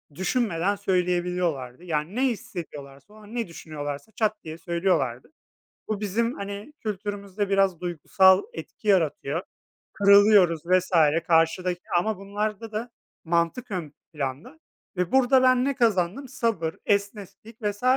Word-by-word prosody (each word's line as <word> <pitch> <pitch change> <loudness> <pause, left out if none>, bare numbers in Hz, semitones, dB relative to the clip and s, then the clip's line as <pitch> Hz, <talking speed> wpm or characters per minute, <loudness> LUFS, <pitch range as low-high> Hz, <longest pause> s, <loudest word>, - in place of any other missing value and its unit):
düşünmeden 195 -1 0
söyleyebiliyorlardı. 180 -7 -1
Yani 160 +3 -3
ne 255 - 0
hissediyorlarsa, 165 - -7
o - - -16
an 215 +2 -12
ne 235 -5 -1
düşünüyorlarsa 145 +1 -7
çat 215 -1 -1
diye 160 0 -7
söylüyorlardı. 170 - -1 0.6
Bu 215 -2 -2
bizim 230 +4 0
hani 200 +7 -7
kültürümüzde 205 -1 -4
biraz 195 -3 +2
duygusal 185 +2 +4
etki 215 - -9
yaratıyor, 165 -4 +1 0.5
kırılıyoruz 200 -5 +5
vs. 185 +1 +2 0.4
karşıdaki. 175 +2 +2 0.2
Ama 215 +1 -1
bunlarda 210 +2 -4
da 230 +3 -4 0.3
mantık 170 +9 0
ön 165 -6 -5 0.2
planda 150 - -5 0.4
ve 180 +3 -1
burada 265 0 +5
ben 255 0 +4
ne 280 0 0
kazandım? 225 +1 +1
Sabır, 225 -11 -1
esneklik 205 +2 -3
vs. 205 +1 -3
195 Hz, 125 wpm, -25 LUFS, 170-215 Hz, 0.6 s, kırılıyoruz